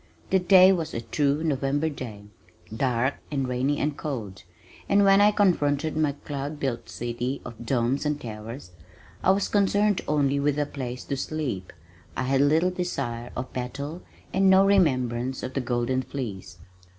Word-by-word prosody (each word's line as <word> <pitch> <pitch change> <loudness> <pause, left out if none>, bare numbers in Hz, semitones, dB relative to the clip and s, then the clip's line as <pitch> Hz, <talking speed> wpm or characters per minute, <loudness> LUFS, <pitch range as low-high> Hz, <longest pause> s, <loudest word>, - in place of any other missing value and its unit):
The 190 - +5
day 185 +1 +7
was 165 -4 -3
a 115 - -2
true 145 +5 0
November 145 0 0
day, 120 -9 -6 0.5
dark 125 +1 0
and 135 -3 -1
rainy 130 +3 0
and 145 0 -1
cold, 115 -12 -5 0.5
and 200 0 +5
when 195 0 +6
I 205 - +7
confronted 155 -7 +1
my 155 -2 +1
cloud 145 +1 -6
built 130 -4 -3
city 120 +3 -3
of 115 0 -8
domes 125 +2 +1
and 150 -1 -1
towers 110 -2 -8 0.5
I - - +3
was 195 +1 +3
concerned 205 0 +2
only 140 -2 +2
with 145 0 +1
a 145 - +1
place 125 -3 -6
to 140 - -3
sleep 130 -12 -3 0.5
I - - 0
had 135 +1 +2
little 160 +5 +3
desire 135 -10 -3
of 130 +1 -5
battle 140 +7 -5 0.3
and 190 0 +4
no 190 +1 +6
remembrance 130 -10 +1
of 130 - -4
the 135 - -1
Golden 120 +1 0
Fleece. 110 -11 -6
140 Hz, 160 wpm, -26 LUFS, 125-155 Hz, 0.5 s, day